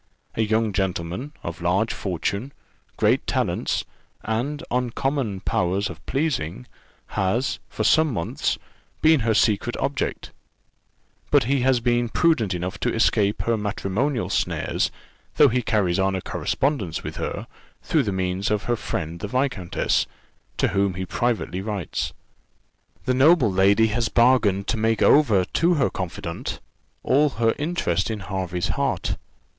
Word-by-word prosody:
A -, -, -1 dB
young 110 Hz, 0 st, +1 dB
gentleman, 95 Hz, -, -2 dB
of 85 Hz, +1 st, -6 dB
large 95 Hz, +6 st, +1 dB
fortune, 100 Hz, -, -3 dB, 0.4 s
great -, -, +2 dB
talents, -, -, 0 dB, 0.4 s
and 135 Hz, +8 st, -2 dB
uncommon 125 Hz, -3 st, -1 dB
powers 95 Hz, +3 st, 0 dB
of -, -, -12 dB
pleasing, 125 Hz, -, -1 dB, 0.4 s
has, 110 Hz, +8 st, 0 dB
for -, -, -3 dB
some 160 Hz, -2 st, +4 dB
months, 85 Hz, -8 st, -1 dB, 0.5 s
been 160 Hz, -1 st, +6 dB
her 115 Hz, -2 st, +1 dB
secret 110 Hz, +2 st, +2 dB
object; 140 Hz, 0 st, -2 dB, 1.0 s
but -, -, +5 dB
he 135 Hz, +4 st, +1 dB
has 130 Hz, 0 st, +3 dB
been 120 Hz, 0 st, +1 dB
prudent 115 Hz, -, +2 dB
enough 90 Hz, +2 st, -4 dB
to -, -, 0 dB
escape 105 Hz, -3 st, +2 dB
her 115 Hz, -, +1 dB
matrimonial 110 Hz, +5 st, -1 dB
snares, -, -, 0 dB, 0.5 s
though 145 Hz, -, +6 dB
he 125 Hz, +1 st, +1 dB
carries 100 Hz, -6 st, +1 dB
on 95 Hz, 0 st, +2 dB
a 95 Hz, -, -2 dB
correspondence 130 Hz, -, -1 dB
with -, -, -6 dB
her, -, -, -4 dB, 0.4 s
through 155 Hz, -, +2 dB
the 110 Hz, -6 st, -1 dB
means 95 Hz, +1 st, -1 dB
of 105 Hz, -1 st, 0 dB
her 120 Hz, -, 0 dB
friend 85 Hz, -6 st, -4 dB
the 105 Hz, -, -4 dB
viscountess, 125 Hz, -6 st, 0 dB, 0.5 s
to -, -, +2 dB
whom 100 Hz, -2 st, +1 dB
he 95 Hz, +1 st, -3 dB
privately 110 Hz, -2 st, -1 dB
writes. 100 Hz, -4 st, -3 dB, 0.9 s
The 130 Hz, -, +2 dB
noble 135 Hz, -, +5 dB
lady 100 Hz, +4 st, +4 dB
has 115 Hz, +1 st, 0 dB
bargained 115 Hz, -5 st, +3 dB
to -, -, +1 dB
make 110 Hz, +1 st, +1 dB
over 110 Hz, -11 st, +5 dB
to 170 Hz, -, +2 dB
her 140 Hz, -4 st, +1 dB
confidante 85 Hz, -2 st, -5 dB, 0.4 s
all 145 Hz, +3 st, +3 dB
her 115 Hz, -1 st, +3 dB
interest 135 Hz, -, 0 dB
in 110 Hz, -2 st, -3 dB
Hervey's 90 Hz, -2 st, -3 dB
heart. -, -, -1 dB
110 Hz, 140 wpm, -24 LUFS, 95-130 Hz, 1.0 s, been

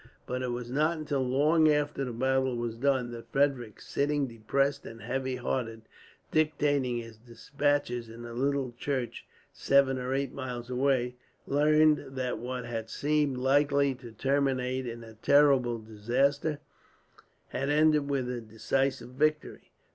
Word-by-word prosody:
But 125 Hz, 0 st, -3 dB
it 130 Hz, -, -2 dB
was 120 Hz, 0 st, -4 dB
not 155 Hz, +5 st, +1 dB
until 145 Hz, -3 st, -2 dB
long 150 Hz, +5 st, +3 dB
after 150 Hz, -1 st, 0 dB
the 125 Hz, -, -3 dB
battle 130 Hz, +1 st, +1 dB
was 120 Hz, -1 st, -3 dB
done 130 Hz, -1 st, +1 dB
that 115 Hz, -1 st, -10 dB
Frederick, 135 Hz, -6 st, 0 dB
sitting 145 Hz, 0 st, 0 dB
depressed 135 Hz, +4 st, -1 dB
and 115 Hz, -, -10 dB
heavy 130 Hz, +3 st, -2 dB
hearted, 115 Hz, -3 st, -3 dB, 0.5 s
dictating 145 Hz, -5 st, +1 dB
his 115 Hz, -2 st, -8 dB
despatches 125 Hz, +1 st, -2 dB
in 115 Hz, +1 st, -10 dB
the 120 Hz, 0 st, -8 dB
little 135 Hz, +1 st, 0 dB
church 130 Hz, -4 st, -3 dB, 0.3 s
seven 135 Hz, -1 st, +3 dB
or 125 Hz, +1 st, -2 dB
eight 140 Hz, -1 st, -2 dB
miles 125 Hz, -2 st, -6 dB
away, 125 Hz, -1 st, +1 dB, 0.3 s
learned 150 Hz, -1 st, +3 dB
that 130 Hz, -1 st, -2 dB
what 125 Hz, 0 st, -4 dB
had 115 Hz, -2 st, -5 dB
seemed 145 Hz, -1 st, 0 dB
likely 140 Hz, +1 st, +3 dB
to 125 Hz, -2 st, -11 dB
terminate 130 Hz, +1 st, 0 dB
in 115 Hz, 0 st, -6 dB
a 110 Hz, -1 st, -12 dB
terrible 130 Hz, 0 st, +4 dB
disaster, 125 Hz, +8 st, 0 dB, 0.9 s
had 135 Hz, +2 st, -2 dB
ended 150 Hz, -1 st, +3 dB
with 135 Hz, -3 st, 0 dB
a 125 Hz, -1 st, -3 dB
decisive 120 Hz, +3 st, -1 dB
victory. 150 Hz, +3 st, -1 dB
130 Hz, 145 wpm, -29 LUFS, 120-140 Hz, 0.9 s, terrible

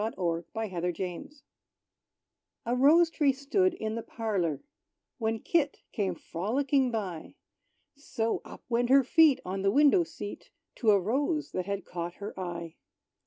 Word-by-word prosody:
=Kit 220 Hz, +2 st, -3 dB
With 170 Hz, -2 st, -1 dB
the 215 Hz, -6 st, -4 dB, 0.2 s
Rose= 185 Hz, -, -9 dB, 1.2 s
A 240 Hz, +2 st, 0 dB
Rose 320 Hz, +6 st, +5 dB
tree 295 Hz, -4 st, +3 dB
stood 355 Hz, +7 st, +1 dB
in 220 Hz, -8 st, -3 dB
the 230 Hz, -, -3 dB
parlor, 190 Hz, -, -2 dB, 0.6 s
When 225 Hz, -1 st, 0 dB
Kit 290 Hz, +4 st, 0 dB
came 195 Hz, -5 st, -1 dB
frolicking 260 Hz, -, 0 dB
by; 195 Hz, -8 st, -5 dB, 0.6 s
So, 230 Hz, -5 st, -2 dB
up -, -, -12 dB
went 240 Hz, 0 st, +1 dB
her 270 Hz, +1 st, +6 dB
feet 305 Hz, +1 st, +5 dB
on 190 Hz, +1 st, -3 dB
the 195 Hz, -, +2 dB
window 295 Hz, -, +5 dB
seat, 205 Hz, -10 st, -8 dB, 0.3 s
To 225 Hz, -, +1 dB
a 205 Hz, -1 st, +6 dB
rose 285 Hz, -, -1 dB
that 185 Hz, 0 st, -3 dB
had 200 Hz, -1 st, -3 dB
caught 175 Hz, 0 st, -5 dB
her 205 Hz, +1 st, -7 dB
eye. 170 Hz, -2 st, -5 dB
225 Hz, 150 wpm, -29 LUFS, 185-280 Hz, 1.2 s, her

